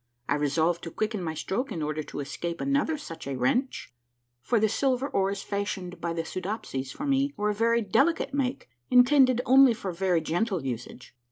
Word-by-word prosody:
I - - +2
re 145 0 0
solved 160 +4 +1
to - - -4
quicken 215 +3 -2
my 160 -2 -3
stroke 205 - -3
in 165 -6 -3
order 155 +1 -2
to 145 - -6
escape 170 +5 -5
another 280 +3 0
such 165 - -9
a 140 - -3
wrench, 130 - -1 0.5
for 235 - +1
the 220 - +3
silver 260 +4 0
oars 195 -5 -1
fashioned 195 -4 -4
by 170 - -2
the 165 -1 -3
Soodopsies 180 - -4
for 290 - -6
me 280 0 +1
were 210 0 +1
of 205 - -7
very 230 +1 +3
delicate 300 - +1
make, 270 -3 -2 0.2
intended 255 0 +5
only 265 -2 +6
for 195 -4 -4
very 180 -1 +1
gentle 175 +1 -1
usage. 120 0 -6
200 Hz, 190 wpm, -27 LUFS, 165-250 Hz, 0.5 s, only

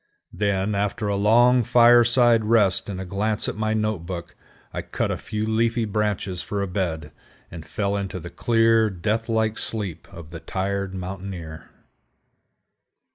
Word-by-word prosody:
Then, 100 0 0
after 105 +1 -1
a 100 - 0
long 120 +5 +4
fireside 120 0 +5
rest 105 -4 +2
and 95 -2 -5
a 95 - -5
glance 105 +4 -1
at - - -3
my 110 +1 -1
note 110 -2 -1
book, 85 -1 -7 0.4
I - - -3
cut - - -3
a - - -1
few 110 0 -3
leafy 115 +1 +1
branches 105 -3 -2
for 100 -1 -3
a - - -3
bed, 85 -5 -3 0.4
and 85 -2 -8
fell 100 -1 -2
into 95 -2 -4
the 85 0 -9
clear, 115 -1 +3
death 105 +5 -2
like 110 -1 0
sleep 105 -7 -4
of 80 -2 -11
the 85 - -7
tired 95 +1 -3
mountaineer. 90 -4 -7
100 Hz, 155 wpm, -23 LUFS, 95-110 Hz, 0.4 s, fireside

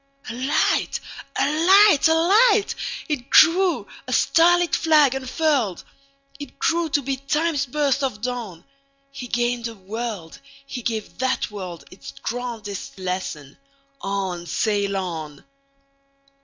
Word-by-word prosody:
A - - -6
light! 260 +4 0 0.4
A - - +2
light! 340 +3 +5
A 320 - +3
light! 405 +6 +4 0.3
It 275 -5 -4
grew, 360 +1 +5 0.2
a - - -5
starlit 350 +1 +3
flag 300 -5 +4
unfurled! 265 - -1 0.6
It 290 - -10
grew 335 0 0
to 285 -1 0
be 270 +1 -2
Time's 290 +1 -1
burst 280 +1 0
of 255 -6 -2
dawn. 225 -8 -5 0.5
He 260 -3 -8
gained 240 0 -1
a 230 - -9
world; 205 -3 -6 0.3
he 255 -2 -6
gave 220 -2 -4
that 260 0 0
worldIts 185 -2 -9
grandest 230 -6 -5
lesson: 180 -6 -5 0.4
"On! 190 -3 -3
sail 200 -1 0
on!" 160 -6 -6
250 Hz, 120 wpm, -22 LUFS, 200-305 Hz, 0.6 s, light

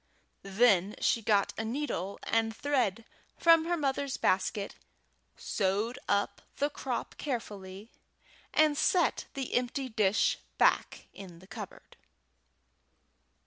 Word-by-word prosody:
Then 195 -1 +3
she 230 - +2
got 205 -2 +2
a - - -1
needle 220 - -3
and 225 -1 0
thread 230 -6 0 0.3
from 330 -1 +5
her 345 +1 0
mother's 275 -2 -1
basket, 200 +2 0 0.6
sewed 205 +6 -1
up 200 0 0 0.2
the 285 +1 0
crop 260 -3 -4
carefully, 210 -6 -5 0.6
and 305 -1 +4
set 350 +4 +2
the 270 -2 -4
empty 255 +2 -1
dish 215 -3 +2 0.2
back - - +2
in 185 -4 -11
the 180 - -16
cupboard. 195 - -10
225 Hz, 110 wpm, -30 LUFS, 200-275 Hz, 0.6 s, from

